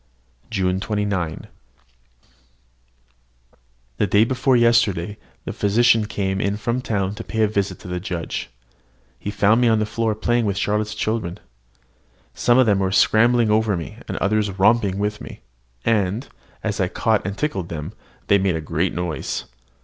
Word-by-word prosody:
JUNE 95 Hz, -3 st, 0 dB
29. 100 Hz, -6 st, -2 dB, 2.5 s
The 105 Hz, -, +1 dB
day 100 Hz, +4 st, +4 dB
before 130 Hz, +2 st, +2 dB
yesterday, 110 Hz, -5 st, +2 dB, 0.3 s
the -, -, -4 dB
physician 115 Hz, +2 st, +3 dB
came 100 Hz, 0 st, -1 dB
from 115 Hz, +3 st, -1 dB
the -, -, -3 dB
town 100 Hz, -5 st, -1 dB
to -, -, -7 dB
pay 110 Hz, 0 st, -1 dB
a -, -, +4 dB
visit 100 Hz, -3 st, -1 dB
to -, -, -10 dB
the 90 Hz, 0 st, -3 dB
judge. 90 Hz, -3 st, -4 dB, 0.7 s
He 100 Hz, -, -5 dB
found 105 Hz, +3 st, +3 dB
me 120 Hz, -, +4 dB
on 110 Hz, -1 st, +4 dB
the 110 Hz, -, +1 dB
floor 110 Hz, 0 st, -1 dB
playing 120 Hz, +1 st, +1 dB
with 100 Hz, -1 st, -1 dB
Charlotte's 105 Hz, +1 st, -1 dB
children. 105 Hz, -4 st, -2 dB, 0.9 s
Some 120 Hz, 0 st, +3 dB
of 130 Hz, -, +6 dB
them 100 Hz, -3 st, +3 dB
were 95 Hz, -1 st, 0 dB
scrambling 115 Hz, +2 st, +4 dB
over 110 Hz, -3 st, +2 dB
me, 80 Hz, -, -7 dB
and -, -, -4 dB
others 105 Hz, +1 st, +1 dB
romped 110 Hz, +3 st, +4 dB
with 105 Hz, +1 st, -2 dB
me; -, -, -10 dB, 0.4 s
and, 105 Hz, +2 st, +1 dB, 0.4 s
as 105 Hz, -3 st, -2 dB
I 95 Hz, -, +2 dB
caught 110 Hz, +3 st, 0 dB
and 100 Hz, +2 st, -4 dB
tickled 100 Hz, -, -2 dB
them, 80 Hz, +3 st, -6 dB, 0.3 s
they 100 Hz, -1 st, +4 dB
made 95 Hz, -2 st, +1 dB
a -, -, -1 dB
great 80 Hz, +3 st, -1 dB
noise. 85 Hz, -3 st, -3 dB
105 Hz, 160 wpm, -22 LUFS, 95-110 Hz, 2.5 s, of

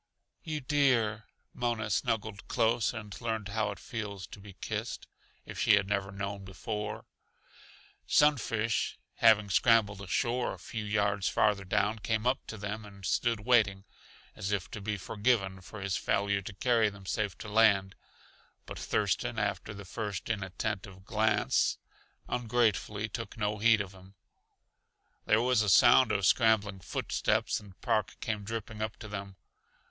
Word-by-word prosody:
"You 155 Hz, -3 st, -4 dB
dear!" 125 Hz, -6 st, +2 dB, 0.3 s
Mona 115 Hz, -3 st, -1 dB
snuggled 105 Hz, 0 st, -1 dB
close 115 Hz, 0 st, +2 dB
and 105 Hz, -4 st, -7 dB
learned 110 Hz, -3 st, -2 dB
how 110 Hz, +2 st, 0 dB
it 100 Hz, -, -5 dB
feels 105 Hz, -5 st, -6 dB
to -, -, -10 dB
be 100 Hz, 0 st, -12 dB
kissed, -, -, -4 dB, 0.4 s
if -, -, -8 dB
she 110 Hz, -, +6 dB
had 100 Hz, -2 st, +1 dB
never 100 Hz, -1 st, -1 dB
known 100 Hz, 0 st, -5 dB
before. 105 Hz, +3 st, -5 dB, 1.0 s
Sunfish, 115 Hz, -6 st, +2 dB, 0.2 s
having 105 Hz, -3 st, +5 dB
scrambled 105 Hz, -1 st, +3 dB
ashore 120 Hz, +5 st, -1 dB
a -, -, -15 dB
few 115 Hz, -2 st, -6 dB
yards 100 Hz, -2 st, +1 dB
farther 105 Hz, -2 st, +2 dB
down, 100 Hz, +3 st, 0 dB
came 110 Hz, +1 st, -1 dB
up 130 Hz, +2 st, 0 dB
to 110 Hz, -, -6 dB
them 105 Hz, +2 st, -5 dB
and 100 Hz, -2 st, -11 dB
stood 115 Hz, +3 st, +1 dB
waiting, 105 Hz, -5 st, +3 dB, 0.5 s
as 95 Hz, -, -3 dB
if 100 Hz, -3 st, -2 dB
to 105 Hz, -, -6 dB
be 105 Hz, +1 st, -2 dB
forgiven 100 Hz, -2 st, 0 dB
for 100 Hz, +2 st, -10 dB
his 95 Hz, 0 st, -1 dB
failure 100 Hz, 0 st, 0 dB
to 100 Hz, +2 st, -8 dB
carry 115 Hz, 0 st, +3 dB
them 100 Hz, -1 st, -13 dB
safe 100 Hz, 0 st, -2 dB
to -, -, -8 dB
land, 105 Hz, -3 st, +4 dB, 0.7 s
but -, -, -8 dB
Thurston, 110 Hz, +3 st, 0 dB
after 100 Hz, -1 st, -2 dB
the 100 Hz, -1 st, -9 dB
first 100 Hz, +2 st, -4 dB
inattentive 95 Hz, -1 st, -4 dB
glance, 110 Hz, -1 st, +2 dB, 0.5 s
ungratefully 110 Hz, -3 st, 0 dB
took 115 Hz, +2 st, -6 dB
no 105 Hz, -1 st, -1 dB
heed 110 Hz, 0 st, +5 dB
of 95 Hz, -2 st, -6 dB
him. 95 Hz, +1 st, -16 dB, 1.1 s
There 110 Hz, +2 st, +3 dB
was 125 Hz, -2 st, +3 dB
a 105 Hz, -, +1 dB
sound 115 Hz, +5 st, +7 dB
of 100 Hz, -2 st, +1 dB
scrambling 105 Hz, -3 st, +3 dB
foot -, -, -5 dB
steps -, -, +1 dB
and 100 Hz, -3 st, -16 dB
Park 105 Hz, -2 st, 0 dB
came 105 Hz, -2 st, -3 dB
dripping 110 Hz, 0 st, -5 dB
up 110 Hz, -, -3 dB
to 110 Hz, -, -9 dB
them. 100 Hz, -2 st, -6 dB
105 Hz, 155 wpm, -30 LUFS, 100-115 Hz, 1.1 s, sound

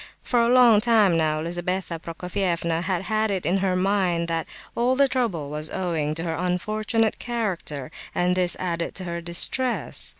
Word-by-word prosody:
For 245 Hz, -, +1 dB
a 235 Hz, -, +2 dB
long 240 Hz, -4 st, +6 dB
time 215 Hz, -6 st, +4 dB
now 155 Hz, -1 st, +1 dB
Lizabetha 175 Hz, 0 st, -3 dB
Prokofievna 170 Hz, 0 st, -2 dB
had 185 Hz, 0 st, -1 dB
had 215 Hz, +1 st, 0 dB
it 190 Hz, -5 st, -2 dB
in 180 Hz, +5 st, +2 dB
her 190 Hz, -1 st, 0 dB
mind 185 Hz, -3 st, +1 dB
that 165 Hz, -1 st, -2 dB, 0.3 s
all 245 Hz, +2 st, +1 dB
the 280 Hz, +1 st, +4 dB
trouble 220 Hz, -, -2 dB
was 150 Hz, +1 st, -4 dB
owing 160 Hz, -5 st, -2 dB
to 165 Hz, -, -1 dB
her 165 Hz, -2 st, -2 dB
"unfortunate 215 Hz, +6 st, -1 dB
character," 185 Hz, -, -4 dB, 0.2 s
and 180 Hz, +1 st, +1 dB
this 180 Hz, -1 st, +2 dB
added 170 Hz, -2 st, -3 dB
to 190 Hz, -, -4 dB
her 170 Hz, -1 st, -4 dB
distress. 205 Hz, +9 st, +2 dB
180 Hz, 170 wpm, -24 LUFS, 170-215 Hz, 0.3 s, long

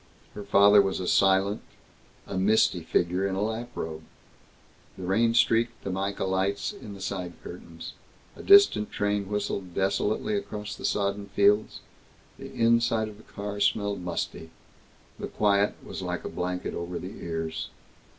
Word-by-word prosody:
Her 105 Hz, -, -7 dB
father 100 Hz, +1 st, +6 dB
was 95 Hz, -1 st, -1 dB, 0.2 s
silent, 95 Hz, +1 st, +3 dB, 0.6 s
a -, -, -6 dB
misty 95 Hz, -2 st, +3 dB
figure 90 Hz, +4 st, 0 dB
in 95 Hz, -, -2 dB
a 95 Hz, -, -1 dB
lap 110 Hz, +2 st, -3 dB
robe. 80 Hz, -1 st, -5 dB, 1.0 s
The 95 Hz, -, -7 dB
rain 115 Hz, +6 st, +2 dB
streaked 115 Hz, 0 st, +2 dB
the 95 Hz, -, -3 dB
mica 100 Hz, +2 st, -2 dB
lights 95 Hz, -, -1 dB
in 105 Hz, -, -10 dB
the -, -, -11 dB
side 95 Hz, -2 st, -4 dB
curtains. 85 Hz, -2 st, -9 dB, 0.4 s
A -, -, -10 dB
distant 400 Hz, -, +6 dB
train 105 Hz, -1 st, -1 dB
whistled 100 Hz, -3 st, -3 dB
desolately 100 Hz, -, 0 dB
across 105 Hz, -, -4 dB
the -, -, -7 dB
sodden 100 Hz, 0 st, -1 dB
fields. 105 Hz, +1 st, +3 dB, 0.6 s
The -, -, -9 dB
inside 115 Hz, -1 st, +2 dB
of 105 Hz, -, -12 dB
the 110 Hz, -, -19 dB
car 100 Hz, 0 st, -5 dB
smelled 100 Hz, -1 st, +1 dB
musty. 85 Hz, -2 st, -4 dB, 0.7 s
The -, -, -4 dB
quiet 100 Hz, -1 st, +2 dB
was -, -, -6 dB
like -, -, -4 dB
a -, -, -3 dB
blanket 90 Hz, 0 st, -3 dB
over 85 Hz, +1 st, -4 dB
the 95 Hz, -, -8 dB
ears. 80 Hz, -1 st, -4 dB
100 Hz, 150 wpm, -27 LUFS, 95-105 Hz, 1.0 s, father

